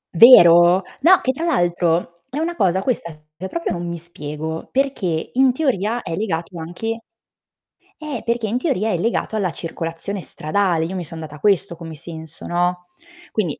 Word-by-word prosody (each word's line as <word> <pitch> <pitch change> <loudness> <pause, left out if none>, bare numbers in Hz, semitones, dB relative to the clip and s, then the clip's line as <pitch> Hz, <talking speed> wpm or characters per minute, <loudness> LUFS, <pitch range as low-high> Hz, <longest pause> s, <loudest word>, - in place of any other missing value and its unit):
Vero? 175 -4 +8 0.2
No 370 +3 +6
che 260 - +1
tra 295 +5 -6
l'altro, 175 - 0
è 275 - -6
una 335 +2 -1
cosa 190 - +2
questa 230 -9 -1 0.2
che 185 +4 -6
proprio 335 - -3
non 175 0 -4
mi 170 - -4
spiego 160 -2 -6
perché 225 - -1
in 260 0 +4
teoria 240 - 0
è 165 - -4
legato 175 -3 -3
anche 225 +8 -4 1.0
eh, 300 -6 -5
perché 235 -1 -1
in 225 +4 0
teoria 225 - 0
è 180 - 0
legato 225 +1 -1
alla 195 -4 0
circolazione 165 +4 -5
stradale, 170 0 0
io 185 - -5
mi 180 - -3
sono 160 +1 -8
data 150 -1 -9
questo 195 -1 +2
come 165 -1 -9
senso 160 0 -9
no, 180 +1 -1 0.5
quindi 180 -9 -2
180 Hz, 170 wpm, -20 LUFS, 165-230 Hz, 1.0 s, Vero